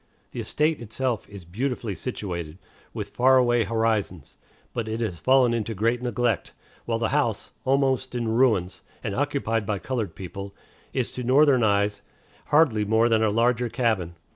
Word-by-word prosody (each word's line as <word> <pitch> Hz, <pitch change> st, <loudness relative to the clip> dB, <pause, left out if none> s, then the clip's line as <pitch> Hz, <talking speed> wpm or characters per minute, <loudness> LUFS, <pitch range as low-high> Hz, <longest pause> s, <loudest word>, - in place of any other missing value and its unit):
The -, -, -6 dB
estate 150 Hz, -2 st, 0 dB
itself 120 Hz, +1 st, -3 dB
is 100 Hz, -4 st, -10 dB
beautifully 115 Hz, +3 st, -3 dB
situated, 85 Hz, -8 st, -5 dB, 0.3 s
with -, -, -5 dB
far 130 Hz, +1 st, +4 dB
away 120 Hz, -3 st, +3 dB
horizons; 110 Hz, -7 st, -1 dB, 0.4 s
but 115 Hz, -2 st, -3 dB
it 110 Hz, +1 st, -3 dB
has 100 Hz, -8 st, -3 dB
fallen 130 Hz, -2 st, +4 dB
into 115 Hz, -1 st, -2 dB
great 115 Hz, +5 st, +1 dB
neglect, 120 Hz, -3 st, -1 dB, 0.3 s
while 115 Hz, -1 st, 0 dB
the 115 Hz, -1 st, -1 dB
house, 130 Hz, -7 st, 0 dB
almost 130 Hz, -1 st, +1 dB
in 120 Hz, -2 st, -1 dB
ruins, 110 Hz, -6 st, +2 dB, 0.2 s
and 100 Hz, -, -2 dB
occupied 135 Hz, -4 st, 0 dB
by 105 Hz, -, 0 dB
colored 110 Hz, -6 st, -3 dB
people, 100 Hz, +2 st, -8 dB, 0.4 s
is 130 Hz, -3 st, -2 dB
to 125 Hz, -, -5 dB
Northern 135 Hz, +1 st, +4 dB
eyes 100 Hz, -1 st, +1 dB, 0.4 s
hardly 145 Hz, -9 st, +3 dB
more 110 Hz, +3 st, +3 dB
than 110 Hz, -1 st, +3 dB
a 110 Hz, -, +3 dB
larger 120 Hz, +2 st, +1 dB
cabin. 110 Hz, -9 st, -1 dB
115 Hz, 160 wpm, -25 LUFS, 105-125 Hz, 0.4 s, far